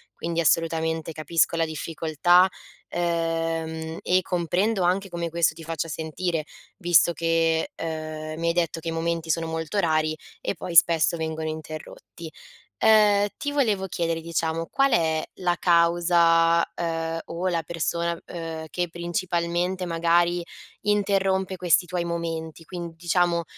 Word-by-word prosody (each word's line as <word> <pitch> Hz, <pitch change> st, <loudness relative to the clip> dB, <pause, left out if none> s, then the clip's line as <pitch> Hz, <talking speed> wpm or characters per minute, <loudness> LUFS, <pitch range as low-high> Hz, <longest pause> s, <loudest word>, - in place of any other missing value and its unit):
Quindi, 170 Hz, 0 st, -3 dB
assolutamente, 160 Hz, 0 st, +1 dB
capisco 160 Hz, +2 st, +1 dB
la 165 Hz, -, +2 dB
difficoltà, 165 Hz, +3 st, +2 dB, 0.4 s
ehm, 165 Hz, -1 st, -2 dB
e 185 Hz, +1 st, +2 dB
comprendo 180 Hz, +4 st, 0 dB
anche 190 Hz, +2 st, +1 dB
come 170 Hz, -1 st, -3 dB
questo 170 Hz, 0 st, +2 dB
ti 165 Hz, -, -11 dB
faccia 165 Hz, 0 st, -3 dB
sentire, 160 Hz, +1 st, -3 dB, 0.3 s
visto 175 Hz, -2 st, +4 dB
che, 165 Hz, -, +1 dB
ehm, 155 Hz, -1 st, -5 dB
mi 170 Hz, -, -1 dB
hai 170 Hz, -, +2 dB
detto 170 Hz, -2 st, 0 dB
che 165 Hz, -, -9 dB
i -, -, 0 dB
momenti 165 Hz, 0 st, -2 dB
sono 165 Hz, +1 st, +1 dB
molto 160 Hz, +3 st, -4 dB
rari, 155 Hz, -3 st, +1 dB, 0.2 s
e -, -, -2 dB
poi 170 Hz, +2 st, -6 dB
spesso 165 Hz, 0 st, +5 dB
vengono 160 Hz, 0 st, -3 dB
interrotti. 155 Hz, +1 st, -8 dB, 0.5 s
Uhm, 210 Hz, -2 st, +5 dB
ti 290 Hz, -, -3 dB
volevo 215 Hz, -9 st, +1 dB
chiedere, 165 Hz, -2 st, -2 dB
diciamo, 165 Hz, 0 st, -2 dB
qual 275 Hz, -2 st, +2 dB
è 160 Hz, -1 st, +2 dB, 0.2 s
la 175 Hz, -1 st, +1 dB
causa, 170 Hz, -1 st, +4 dB
uhm, 165 Hz, -1 st, -2 dB
o 175 Hz, +3 st, -3 dB
la 165 Hz, -2 st, -1 dB
persona, 170 Hz, +1 st, -2 dB
uhm, 165 Hz, -2 st, -6 dB
che 175 Hz, +2 st, -2 dB
principalmente, 175 Hz, +1 st, -2 dB
magari, 170 Hz, +1 st, +2 dB, 0.4 s
interrompe 195 Hz, -2 st, +1 dB
questi 175 Hz, 0 st, +3 dB
tuoi 175 Hz, 0 st, -2 dB
momenti? 165 Hz, -1 st, -4 dB
Quin 170 Hz, -1 st, -7 dB
diciamo, 175 Hz, 0 st, +1 dB
170 Hz, 135 wpm, -25 LUFS, 160-175 Hz, 0.5 s, spesso